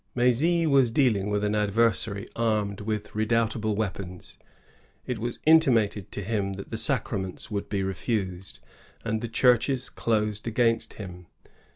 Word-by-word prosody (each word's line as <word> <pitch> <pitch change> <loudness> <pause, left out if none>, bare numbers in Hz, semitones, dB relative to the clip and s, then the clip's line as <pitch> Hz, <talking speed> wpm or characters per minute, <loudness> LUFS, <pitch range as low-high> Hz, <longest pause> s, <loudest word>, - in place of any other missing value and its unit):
"i 120 - -1
M^zy 160 +8 +3
was 135 -4 +4
dealing 115 -6 +2
with 105 0 0
an 105 0 0
adversary 105 -1 +1
armed 105 -3 0
with 105 0 -4
redoubtable 110 0 0
weapons. 95 -3 -5 0.7
It 125 -3 -3
was 120 +2 -3
intimated 115 - +3
to 100 - -4
him 100 -1 -1
that 100 0 -9
the 115 - -3
sacraments 110 -8 -1
would 100 -1 -3
be 100 -2 -1
refused, 95 -1 -3 0.4
and 110 0 -1
the 120 - -3
churches 125 +2 +2
closed 105 -1 -1
against 115 0 +1
him. 90 -4 -9
110 Hz, 145 wpm, -26 LUFS, 100-115 Hz, 0.7 s, was